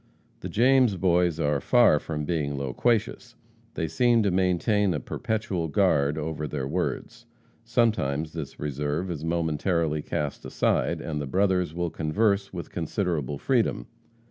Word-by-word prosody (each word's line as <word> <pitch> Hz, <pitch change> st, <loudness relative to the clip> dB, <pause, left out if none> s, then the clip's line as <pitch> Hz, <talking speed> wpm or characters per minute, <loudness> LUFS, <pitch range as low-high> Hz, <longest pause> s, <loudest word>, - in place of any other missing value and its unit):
"The -, -, -6 dB
James 125 Hz, -2 st, +4 dB
Boys 90 Hz, -2 st, +2 dB
are 75 Hz, -2 st, +1 dB
far 120 Hz, -, +5 dB
from 75 Hz, -1 st, -4 dB
being 75 Hz, -3 st, -1 dB
loquacious. 95 Hz, -, -1 dB, 0.4 s
They 80 Hz, -, -1 dB
seem 115 Hz, +8 st, +3 dB
to 100 Hz, -, +1 dB
maintain 95 Hz, +1 st, +1 dB
a -, -, -1 dB
perpetual 110 Hz, -, -3 dB
guard 75 Hz, -4 st, +2 dB
over 75 Hz, 0 st, -3 dB
their 70 Hz, -2 st, -3 dB
words. 90 Hz, +6 st, -3 dB, 0.4 s
Sometimes 80 Hz, -, 0 dB
this 80 Hz, -4 st, -7 dB
reserve 75 Hz, +5 st, -2 dB
is 80 Hz, -3 st, -5 dB
momentarily 80 Hz, -1 st, 0 dB
cast 75 Hz, -1 st, -3 dB
aside, -, -, 0 dB
and 75 Hz, -2 st, -3 dB
the 70 Hz, -, -4 dB
brothers 90 Hz, 0 st, +1 dB
will 85 Hz, -1 st, -2 dB
converse 100 Hz, +5 st, 0 dB
with 85 Hz, -2 st, -7 dB
considerable 80 Hz, -, -2 dB
freedom. 115 Hz, -, 0 dB
85 Hz, 140 wpm, -26 LUFS, 75-100 Hz, 0.4 s, far